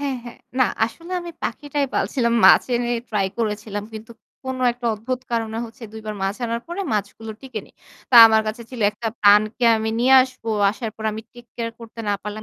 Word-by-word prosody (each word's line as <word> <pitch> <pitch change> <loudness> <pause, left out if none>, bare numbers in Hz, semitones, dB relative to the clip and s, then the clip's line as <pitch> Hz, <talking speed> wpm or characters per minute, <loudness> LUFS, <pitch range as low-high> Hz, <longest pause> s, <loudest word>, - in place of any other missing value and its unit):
হ্যাঁ, 280 -2 -2
হ্যাঁ। 240 - -10 0.2
না 255 - +6 0.2
আসলে 335 +10 -11
আমি 345 - -7
পাখিটাই 285 +3 -2
পালছিলাম। 235 -4 0
মাছ - - +8
এনে 240 0 -2 0.2
ট্রাই 205 -3 0
করেছিলাম। 210 -2 -3
কিন্তু 220 +1 -9 0.3
কোন 260 0 -3 0.2
একটা 240 0 -6
অদ্ভুত 250 +4 -4
কারণে 225 -1 -2
হচ্ছে 230 +1 -13
২ 220 - -8
বার 215 - -3
মাছ 195 +2 -1
আনার 230 0 -2
পরে 345 +3 -4
মাছগুলো 215 +2 -3
টিকে 255 -5 -6
নিই। - - -24 0.4
তা 245 - +6
আমার 220 0 +3
কাছে 225 +2 -5
ছিল 250 -3 -8
একটা 220 +2 -4
প্রাণকে 210 +4 +4
আমি 220 0 -2
নিয়ে 260 +2 +5
আসবো। 255 -3 -6 0.2
আসার 215 +2 -5
পর 220 - -8
আমি 220 +1 -6
take 240 -1 -15
care 230 -1 -3
করতে 230 0 -10
না - - +2
পারলাম 210 +1 -6
230 Hz, 205 wpm, -22 LUFS, 215-250 Hz, 0.4 s, মাছ